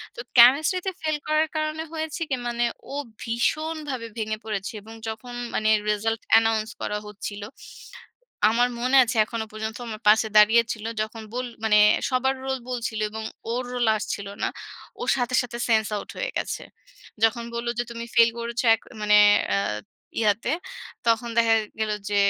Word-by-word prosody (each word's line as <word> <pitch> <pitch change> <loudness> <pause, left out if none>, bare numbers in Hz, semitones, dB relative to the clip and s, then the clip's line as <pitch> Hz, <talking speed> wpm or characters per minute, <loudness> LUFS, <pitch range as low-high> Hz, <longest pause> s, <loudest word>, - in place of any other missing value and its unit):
তো - - -10 0.2
কেমিস্ট্রিতে 310 +10 +6
ফেইল 310 -1 0
করার 310 +1 +2
কারণে 310 +1 -1
হয়েছে 315 0 -4
কি? 265 - +1
মানে, 240 0 -1 0.3
ও - - -4 0.3
ভীষণভাবে 285 +2 -2
ভেঙে 215 -1 -2
পড়েছে 210 -2 -3
এবং 220 +2 -12
যখন 225 +3 -6 0.2
মানে 215 0 +1 0.2
রিসাল্ট 225 +2 0
অ্যানাউন্স 225 -1 +4
করা 210 - -2
হচ্ছিল, 205 0 -7 1.1
আমার 245 +2 +3
মনে 255 +2 +2
আছে 235 - -3
এখনো 225 0 -4
পর্যন্ত, 220 +1 -5
আমার 215 0 -6
পাশে 220 +1 +6
দাঁড়িয়েছিল। 220 +1 +4 0.2
যখন 220 +1 -5
বোল 250 +1 -2 0.2
মানে 210 -1 +4 0.3
সবার 265 +1 +1
রোল 265 0 -1
বলছিল 235 -3 -3
এবং 220 +1 -6 0.3
ওর 250 +2 -1
রোল 245 -1 +1
আসছিল 200 -1 -4 0.2
না, - - +3 0.5
ওর - - -1
সাথে, 245 0 -1
সাথে 235 -1 -6
সেন্স 220 -2 +3
আউট 205 - -5
হয়ে - - -2
গেছে। - - -3 0.6
যখন 235 +1 +3
বলল 235 0 -4
যে, 240 - +2
"তুমি 235 0 -6
ফেইল 230 -1 +7
করেছ 235 0 -2
এক 225 - -1 0.2
মানে 210 0 +4 0.4
আ - - +2 0.6
ইয়াতে" 220 +4 +1 0.6
তখন 230 +1 +2
দেখা 230 -1 +5 0.3
গেল 215 -1 0 0.2
যে, 205 - -1
230 Hz, 160 wpm, -25 LUFS, 220-255 Hz, 1.1 s, ফেইল